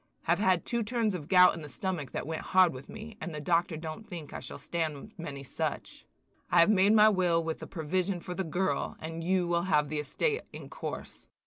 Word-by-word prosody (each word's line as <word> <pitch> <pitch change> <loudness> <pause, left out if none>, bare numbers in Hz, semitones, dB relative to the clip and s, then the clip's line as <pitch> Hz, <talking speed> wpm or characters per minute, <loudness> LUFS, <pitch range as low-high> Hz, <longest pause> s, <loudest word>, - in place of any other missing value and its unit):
Have 170 +2 +2
had 185 -4 +2
two 235 -1 -1
turns 225 -1 0
of 155 -5 -5
gout 180 0 +7
in 165 - -7
the 150 - -8
stomach 175 -4 -3
that - - -4
went 160 +1 -4
hard 185 -3 +4
with 130 +1 -10
me, 220 0 -9
and 170 -4 -5
the - - -4
doctor 165 +2 +1
don't 160 +7 -7
think 165 -6 -7
I - - -4
shall - - -7
stand 160 +5 -4
many 145 -6 -7
such. 130 - -4 0.4
I 175 - +4
have 170 +5 +6
made 200 +1 +5
my 215 -1 +7
will 180 -5 +3
with 160 -1 -4
a - - -6
provision 180 +3 -1
for 180 +1 -6
the 190 - -2
girl, 180 +3 -1
and 165 +1 -6
you 180 0 +1
will 170 0 +1
have 150 -3 +3
the 155 0 -2
estate 440 - 0
in - - -9
course. - - -7
175 Hz, 225 wpm, -30 LUFS, 160-190 Hz, 0.4 s, gout